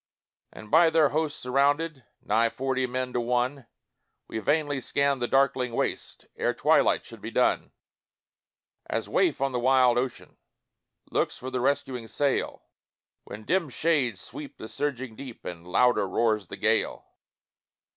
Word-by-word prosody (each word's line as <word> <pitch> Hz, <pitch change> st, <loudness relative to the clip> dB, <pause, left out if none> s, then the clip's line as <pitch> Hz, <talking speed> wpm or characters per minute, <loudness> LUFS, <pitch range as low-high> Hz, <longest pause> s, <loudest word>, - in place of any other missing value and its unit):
And 110 Hz, -1 st, -12 dB
by 165 Hz, +1 st, +6 dB
their 160 Hz, -2 st, +4 dB
hosts 155 Hz, 0 st, -1 dB
surrounded, 140 Hz, +3 st, +1 dB, 0.2 s
Nigh 115 Hz, +2 st, +2 dB
forty 130 Hz, +1 st, -1 dB
men 125 Hz, 0 st, -3 dB
to 120 Hz, -, 0 dB
one, 125 Hz, +2 st, -1 dB, 0.6 s
We 110 Hz, -, -4 dB
vainly 145 Hz, +1 st, 0 dB
scanned 140 Hz, +1 st, 0 dB
the 120 Hz, -, +1 dB
darkling 135 Hz, -2 st, +2 dB
waste -, -, -3 dB
Ere 460 Hz, +2 st, 0 dB
twilight -, -, +3 dB
should -, -, -12 dB
be -, -, -5 dB
done; -, -, +1 dB, 1.2 s
As -, -, -2 dB
waif 355 Hz, -4 st, +1 dB
on 135 Hz, 0 st, +1 dB
the 125 Hz, -, -1 dB
wide 125 Hz, -1 st, +4 dB
ocean, 130 Hz, -1 st, -5 dB, 0.7 s
Looks -, -, 0 dB
for 130 Hz, +1 st, -7 dB
the 125 Hz, -, -1 dB
rescuing 130 Hz, -3 st, -1 dB
sail, 140 Hz, +3 st, -1 dB, 0.6 s
When 105 Hz, -, -9 dB
dim 175 Hz, -4 st, +1 dB
shades 130 Hz, -, 0 dB
sweep 145 Hz, +4 st, -8 dB
the 110 Hz, -, -8 dB
surging 130 Hz, -5 st, -3 dB
deep, 130 Hz, -1 st, -10 dB
And 85 Hz, 0 st, -7 dB
louder 125 Hz, +2 st, +3 dB
roars 105 Hz, 0 st, +1 dB
the -, -, -8 dB
gale. -, -, 0 dB
130 Hz, 145 wpm, -27 LUFS, 120-145 Hz, 1.2 s, by